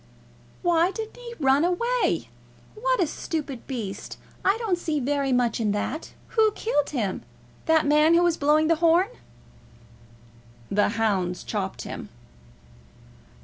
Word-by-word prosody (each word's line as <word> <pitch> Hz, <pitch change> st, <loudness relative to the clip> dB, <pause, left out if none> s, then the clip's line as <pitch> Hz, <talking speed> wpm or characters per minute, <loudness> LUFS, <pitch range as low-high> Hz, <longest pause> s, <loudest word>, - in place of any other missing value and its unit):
"Why 345 Hz, 0 st, +3 dB
didn't 440 Hz, +4 st, -6 dB
he 475 Hz, -1 st, -9 dB
run 275 Hz, +1 st, +4 dB
away? 470 Hz, +8 st, 0 dB, 0.4 s
What -, -, 0 dB
a 360 Hz, -, +4 dB
stupid 290 Hz, -4 st, -5 dB
beast! 225 Hz, -8 st, -5 dB, 0.3 s
I 390 Hz, +3 st, +3 dB
don't 425 Hz, -7 st, -1 dB
see 315 Hz, -3 st, -1 dB
so 255 Hz, -, -4 dB
very 280 Hz, -1 st, 0 dB
much 245 Hz, -2 st, +1 dB
in 210 Hz, -3 st, +1 dB
that. 255 Hz, +10 st, -3 dB, 0.2 s
Who 440 Hz, -2 st, +3 dB
killed 295 Hz, -12 st, 0 dB
him? 215 Hz, -9 st, -2 dB, 0.5 s
That 320 Hz, -1 st, +4 dB
man 300 Hz, +3 st, +5 dB
that 345 Hz, -, +5 dB
was 345 Hz, -2 st, +3 dB
blowing 300 Hz, +1 st, +3 dB
the 330 Hz, 0 st, +3 dB
horn?" 340 Hz, +4 st, +4 dB, 1.6 s
"The 205 Hz, +1 st, +3 dB
hounds 190 Hz, -5 st, 0 dB
chopped 195 Hz, -3 st, -3 dB
him." -, -, -7 dB
310 Hz, 140 wpm, -25 LUFS, 250-360 Hz, 1.6 s, man